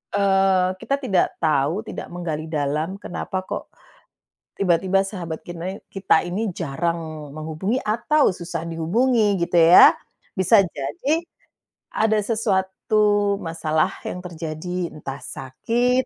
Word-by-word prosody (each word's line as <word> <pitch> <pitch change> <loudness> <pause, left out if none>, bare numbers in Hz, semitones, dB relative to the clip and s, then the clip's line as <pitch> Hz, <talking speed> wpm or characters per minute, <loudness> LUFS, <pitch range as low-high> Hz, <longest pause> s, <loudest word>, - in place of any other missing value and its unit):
eee, 195 -2 +3
kita 275 - 0
tidak 195 -8 +3 0.2
tahu, 155 +6 +1
tidak - - -6
menggali 160 -3 -4
dalam 155 +4 -1
kenapa 185 0 -5
kok - - -4 1.0
tiba-tiba 190 +1 +2
sahabat 170 -5 -6
kinai 175 +3 -5
kita 190 -4 +1
ini 200 +5 -2
jarang 160 -2 -4
menghubungi 160 +9 -2
atau 240 +3 +2
susah 170 -2 -5
dihubungi 205 +6 +1
gitu 170 +1 -2
ya. 170 +1 +8 0.4
Bisa 190 +4 +5
jadi 170 - -2 0.7
ada 220 0 +2
sesuatu 205 -1 +1
masalah 160 0 0 0.2
yang 180 - -4
terjadi, 170 +1 -5
entah 140 -2 -7
sakit 240 - -1
180 Hz, 110 wpm, -22 LUFS, 160-205 Hz, 1.0 s, ya